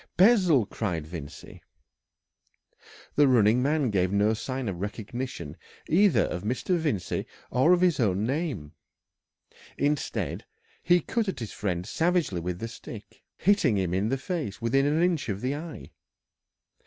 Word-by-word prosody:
"Bessel!" 185 Hz, -, +5 dB
cried 90 Hz, -8 st, -3 dB
Vincey. 80 Hz, -2 st, -9 dB, 1.5 s
The 145 Hz, -1 st, +5 dB
running 120 Hz, -1 st, +4 dB
man 145 Hz, -2 st, +1 dB
gave 95 Hz, -2 st, +1 dB
no 105 Hz, +2 st, +3 dB
sign 130 Hz, +2 st, -4 dB
of 90 Hz, -3 st, -4 dB
recognition 110 Hz, -, -5 dB, 0.3 s
either 175 Hz, -, +4 dB
of 90 Hz, -, -3 dB
Mr. 125 Hz, -, -1 dB
Vincey 145 Hz, -, -2 dB, 0.2 s
or 130 Hz, +8 st, +4 dB
of 180 Hz, -1 st, +4 dB
his 175 Hz, -6 st, +3 dB
own 100 Hz, -3 st, +1 dB
name. 130 Hz, -, -2 dB, 1.1 s
Instead, 145 Hz, +1 st, -1 dB, 0.4 s
he 175 Hz, 0 st, +4 dB
cut 225 Hz, +6 st, -1 dB
at 190 Hz, -, -2 dB
his 115 Hz, -4 st, -5 dB
friend 90 Hz, -3 st, -2 dB
savagely 165 Hz, -, 0 dB
with 90 Hz, +1 st, -3 dB
the 115 Hz, -, -4 dB
stick, 115 Hz, -2 st, -11 dB, 0.2 s
hitting 195 Hz, -, +3 dB
him 90 Hz, -2 st, -1 dB
in 100 Hz, +4 st, +1 dB
the 135 Hz, -, 0 dB
face 150 Hz, -, -4 dB
within 135 Hz, +4 st, +2 dB
an 155 Hz, +3 st, +2 dB
inch 170 Hz, -8 st, 0 dB
of 100 Hz, -1 st, -2 dB
the 130 Hz, +2 st, -1 dB
eye. 155 Hz, +2 st, -8 dB
Mr. -, -, -58 dB
125 Hz, 150 wpm, -27 LUFS, 100-160 Hz, 1.5 s, Bessel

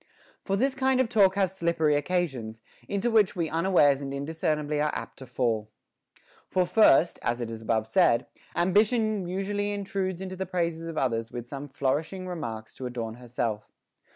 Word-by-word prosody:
For 195 Hz, -, 0 dB
this 265 Hz, +5 st, +2 dB
kind 265 Hz, -1 st, +2 dB
of 260 Hz, -3 st, +2 dB
talk 200 Hz, -5 st, +4 dB
has 190 Hz, -2 st, +1 dB
slip 170 Hz, -2 st, 0 dB
pery 155 Hz, -2 st, +3 dB
occasions, 145 Hz, -9 st, -2 dB, 0.3 s
into 205 Hz, +4 st, 0 dB
which 215 Hz, -4 st, +4 dB
we 165 Hz, -4 st, -2 dB
unawares 160 Hz, -5 st, +3 dB
and 135 Hz, -1 st, -5 dB
indiscerniblv 150 Hz, +1 st, -1 dB
are 150 Hz, -, -1 dB
apt -, -, -6 dB
to 130 Hz, -, -10 dB
fall. 115 Hz, -3 st, -1 dB, 0.8 s
For 185 Hz, -1 st, +2 dB
first 175 Hz, -4 st, +4 dB
(as 120 Hz, +1 st, -1 dB
is 115 Hz, -2 st, -5 dB
above 110 Hz, -1 st, 0 dB
said), 115 Hz, +1 st, +3 dB, 0.3 s
ambition 210 Hz, +2 st, +2 dB
usually 200 Hz, +3 st, -2 dB
intrudes 195 Hz, -2 st, -2 dB
into 190 Hz, 0 st, -5 dB
the 190 Hz, 0 st, -4 dB
praises 170 Hz, -2 st, -2 dB
of 165 Hz, -1 st, -6 dB
others 115 Hz, -4 st, -1 dB
with 120 Hz, -1 st, -6 dB
some 140 Hz, +2 st, -7 dB
flourishing 145 Hz, +8 st, -1 dB
remarks 115 Hz, -11 st, -5 dB
to 130 Hz, -, -6 dB
adorn 115 Hz, -2 st, -4 dB
herself. 115 Hz, -3 st, -3 dB
165 Hz, 170 wpm, -27 LUFS, 125-190 Hz, 0.8 s, talk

